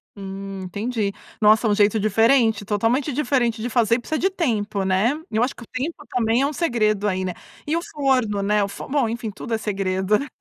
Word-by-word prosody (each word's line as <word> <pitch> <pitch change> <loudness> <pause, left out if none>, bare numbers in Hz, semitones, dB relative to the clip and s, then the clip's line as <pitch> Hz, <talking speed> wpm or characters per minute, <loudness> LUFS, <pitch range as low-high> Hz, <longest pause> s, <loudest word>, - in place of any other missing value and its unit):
Hum, 195 0 -7
entendi. 205 +3 -2 0.3
Nossa, 215 +2 +5
um 205 - +3
jeito 210 +1 +3
diferente, 225 0 +3
totalmente 230 +8 +1
diferente 245 -5 0
de 240 - -2
fazer 230 -1 +3
e - - -1
precisa 310 +6 -3
de 385 - +2
tempo, 215 - -1
né. 190 +7 +2 0.2
Eu 220 +2 +1
acho 255 - -1
que 235 - -11
o - - -15
tempo 295 +4 -4
também 235 0 +1
é - - +3
um 300 - -4
segredo 215 - +1
aí, 185 -1 -1
né. 185 - -2 0.3
E 310 - +1
o - - -1
forno, 255 -10 0
né, 205 +1 +2
o - - -1
fo 200 - -8
bom, 270 -4 +1
enfim, 230 -1 -4
tudo 225 +3 -6
é - - +2
segredo, 195 -1 0
né. 285 - -5
220 Hz, 220 wpm, -22 LUFS, 205-255 Hz, 0.3 s, Nossa